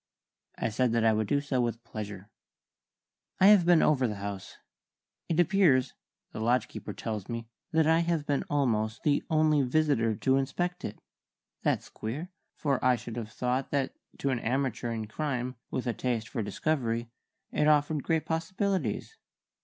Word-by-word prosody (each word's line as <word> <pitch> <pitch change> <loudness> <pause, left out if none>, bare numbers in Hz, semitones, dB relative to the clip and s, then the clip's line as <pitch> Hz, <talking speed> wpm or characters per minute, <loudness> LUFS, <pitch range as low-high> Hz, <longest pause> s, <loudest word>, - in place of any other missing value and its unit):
I 115 - -1
said 120 +2 +1
that 115 -1 +2
I 110 - +5
would 110 -1 0
do 140 - +2
so 140 -3 0
with 120 -1 -2
pleasure. 105 -3 -7 1.1
"I 190 - +8
have 195 -5 +6
been 175 -2 +6
over 130 -4 +3
the 105 - -3
house. 100 -1 -6 0.7
It 165 0 +1
appears 170 -7 +4 0.4
the - - -6
lodge 115 0 +2
keeper - - -7
tells 110 -4 -5
me 115 -1 -4 0.2
that 160 -1 +3
I 160 +1 +4
have 170 -3 0
been 145 -1 0
almost 110 -6 0
the 145 -2 +3
only 155 -2 +4
visitor 130 -5 +2
to 130 +6 +2
inspect 175 +7 -2
it. 105 - -5 0.6
That's - - 0
queer, 145 +12 -5 0.2
for 140 -4 0
I 125 0 +5
should 120 -1 -7
have 110 -2 -5
thought 125 +2 -1
that 140 -2 0 0.2
to 140 - 0
an 125 - 0
amateur 125 0 -1
in 110 -1 -3
crime 130 +1 -3
with 130 - -3
a 120 - 0
taste 115 -3 -2
for 120 - -2
discovery 115 +1 -1 0.4
it 150 - +2
offered 150 0 +3
great 160 +3 0
possibilities. 165 - -1
130 Hz, 170 wpm, -29 LUFS, 115-155 Hz, 1.1 s, I